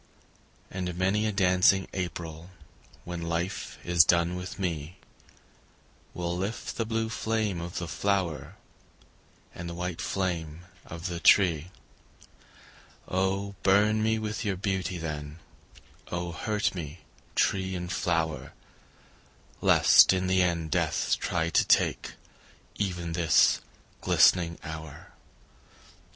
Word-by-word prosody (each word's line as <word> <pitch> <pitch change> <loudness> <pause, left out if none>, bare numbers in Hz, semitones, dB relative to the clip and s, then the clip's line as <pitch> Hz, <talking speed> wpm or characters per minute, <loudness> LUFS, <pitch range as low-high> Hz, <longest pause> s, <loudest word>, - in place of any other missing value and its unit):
And 90 -2 -4
many 100 +4 +1
a - - 0
dancing 95 -1 +3
April 85 -2 -5 0.5
When 85 -1 -6
life 85 +2 -3
is 85 -1 +6
done 85 +1 +2
with 90 +1 -6
me, 85 -3 -4 1.2
Will 85 0 -2
lift 100 +6 -4
the 115 - -1
blue 110 0 -1
flame 105 -2 -2
of 85 +1 -6
the 85 - -3
flower 95 -4 -1 1.0
And 85 0 -7
the 85 - -6
white 90 -1 -4
flame 85 -4 -3 0.3
of 85 0 -8
the 85 -2 -3
tree. 85 -3 +4 1.4
Oh 95 +2 -1
burn 105 +3 +3
me 110 0 +2
with 110 +1 -4
your 100 -3 -1
beauty, 95 -2 -2
then, 75 -2 -5 0.7
Oh 85 0 -3
hurt 105 +5 -1
me, 80 -6 -7 0.3
tree 95 -1 +1
and 90 0 -5
flower, 80 -2 -1 1.1
Lest - - +6
in 95 0 0
the 95 0 +3
end 85 -3 0
death - - +1
try 85 -1 -1
to - - +4
take - - +1 0.6
Even 90 -4 -3
this 80 -2 +4 0.4
glistening 85 -2 +4
hour. 80 -2 -9
90 Hz, 115 wpm, -28 LUFS, 85-95 Hz, 1.4 s, is